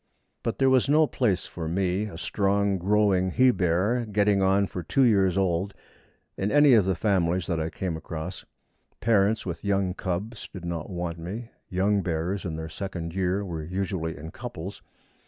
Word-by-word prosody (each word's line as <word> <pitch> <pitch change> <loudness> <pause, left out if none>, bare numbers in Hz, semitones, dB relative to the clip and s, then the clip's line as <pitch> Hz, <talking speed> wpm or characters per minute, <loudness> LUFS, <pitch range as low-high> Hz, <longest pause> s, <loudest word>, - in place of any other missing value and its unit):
But 115 - -2
there 135 - +3
was 130 0 +3
no 155 +2 +5
place 110 -11 0
for 80 -2 -6
me 95 +3 0
a 100 -6 -8
strong, 100 +1 +1
growing 95 -1 +2
he 125 +7 +4
bear, 100 +5 +1
getting 100 -1 +3
on 95 +1 +3
for 90 - -5
two 135 - +2
years 100 -6 +3
old 95 +1 0 0.6
in 100 +2 -1
any 145 -2 +6
of 110 -5 +5
the 95 -1 +1
families 90 -3 +1
that 85 -4 -1
I 80 0 -1
came 90 -1 -3
across. 80 0 -6 0.6
Parents 110 -1 +2
with 85 -3 -5
young 100 -2 +1
cubs 100 +5 -4
did 90 -3 -8
not 85 -2 -4
want 85 -2 -4
me. 105 +8 -6 0.2
Young 100 +2 +2
bears 90 +3 -2
in 85 -3 -3
their 80 0 -5
second 85 -1 -5
year 95 +2 0
were 85 -4 -4
usually 90 -2 -3
in 80 +3 -8
couples. 90 +5 -7
95 Hz, 175 wpm, -26 LUFS, 85-105 Hz, 0.6 s, any